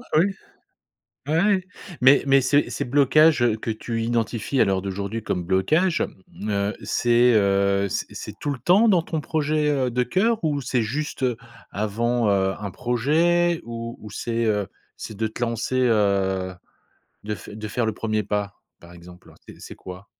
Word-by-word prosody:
Oui. 165 +4 +5 1.0
Ouais, 160 +2 +2
ouais. 200 -1 +3 0.4
Mais 135 +2 +6
mais 135 0 +4
ces 145 +3 +2
ces - - -2
blocages, 145 +2 +4
heu, 115 -3 +3
que 110 - -6
tu 115 +1 -3
identifies 115 +2 -1
à - - +5
l'heure 95 -1 0
d'aujourd'hui 100 +3 -4
comme 90 -4 -2
blocages, 155 - +1 0.3
mmh, 105 - -7
heu, 100 +1 0
c'est, 120 0 +3
heu, 100 -1 +2
c'est - - -3
c'est - - -8
tout 145 - -3
le 140 - -2
temps 190 - +4
dans 175 -5 +3
ton 160 -3 -3
projet, 150 0 0
heu, 135 -4 0
de 125 +1 0
cœur? 215 - 0
Ou 145 -3 0
c'est 125 -1 0
juste, 140 +5 -4
heu, 125 -3 +1 0.3
avant, 115 +3 0
heu, 95 -1 +1
un 100 -2 -5
projet? 160 - +1
Ou 115 0 -6
ou 105 - -9
c'est, 115 +1 -2
heu, 105 -3 0 0.3
c'est 110 - -8
de 110 +2 -1
te 110 - -10
lancer, 115 +2 -2
heu, 100 -5 +1 0.7
de 105 0 -3
f 85 - -13
de 110 +1 -7
faire 115 +2 -1
le 110 - -1
1er 110 -1 -2
pas, 100 0 -2 0.3
par 85 - -14
exemple? 90 +1 -15 0.2
C'est - - -11
c'est - - -10
quoi? 90 +2 -10
115 Hz, 180 wpm, -23 LUFS, 100-145 Hz, 1.0 s, Mais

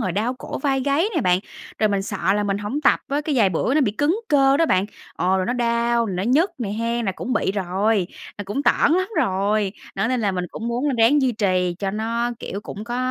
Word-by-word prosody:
rồi 185 - -1
đau 225 +6 -1
cổ 255 - -6
vai 270 -1 0
gáy 285 +7 +1
này 325 - 0
bạn. 180 -4 +3 0.4
Rồi 215 - +3
mình 200 -1 0
sợ 195 -2 -1
là 210 - +1
mình 200 -1 -1
hổng 210 +9 -3
tập 280 - +3
á, 285 +2 0
cái 300 -1 -2
vài 200 -4 +5
bữa 185 +9 0
nó 305 - +4
bị 225 -7 +2
cứng 310 - 0
cơ 275 -2 +4
đó 330 +2 +3
bạn, 190 -8 +2 0.3
ồ, 185 +1 +1
rồi 185 -1 -1
nó - - 0
đau, 235 -1 +1
rồi 195 - -3
nó 185 - -1
nhức 290 - +3
nè 235 -5 -3
hén, 230 +2 -1
là 195 - 0
cũng 250 - -5
bị 190 - +1
rồi, 195 +1 0 0.3
là 205 - -4
cũng 210 +8 -3
tởn 290 - +3
lắm 370 +2 +1
rồi. 200 +1 +1 0.2
Đó, 225 - 0
nên 255 -1 0
là 205 -3 0
mình 180 -1 -2
cũng 230 - -5
muốn 245 +4 -1
là 270 - 0
ráng 270 +6 +5
duy 255 -2 +2
trì 185 -5 0
cho 195 -1 -2
nó, 230 +3 -1
kiểu, 200 - -6
cũng 210 0 -8
có 240 +1 -4
225 Hz, 260 wpm, -22 LUFS, 195-265 Hz, 0.4 s, vài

